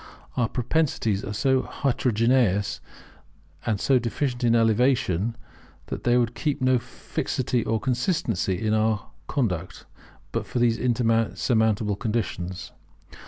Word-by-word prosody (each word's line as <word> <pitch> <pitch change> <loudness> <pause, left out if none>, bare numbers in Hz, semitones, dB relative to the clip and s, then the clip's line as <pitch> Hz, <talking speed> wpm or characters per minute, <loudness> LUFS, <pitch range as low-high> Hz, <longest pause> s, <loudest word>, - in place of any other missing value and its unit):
Our 120 -2 +1
propensities 120 -6 0
are 105 - -4
so 130 +5 +2
heterogeneous 115 -6 +1 0.9
and 110 -4 +1
so 130 +3 +3
deficient 120 +2 -2
in 120 -1 +4
elevation, 115 -3 +2 0.5
that - - -6
there 120 0 +4
would 120 -1 0
be 150 +1 -1
no 130 -1 +3
fixity 125 0 -2
or 110 0 0
consistency 125 - 0
in 110 -1 0
our 110 -1 0 0.2
conduct, 95 - -2 0.5
but - - -3
for - - -4
these 120 -1 +2
insurmountable 115 -3 +1
conditions. 95 -6 -3
115 Hz, 115 wpm, -25 LUFS, 105-125 Hz, 0.9 s, in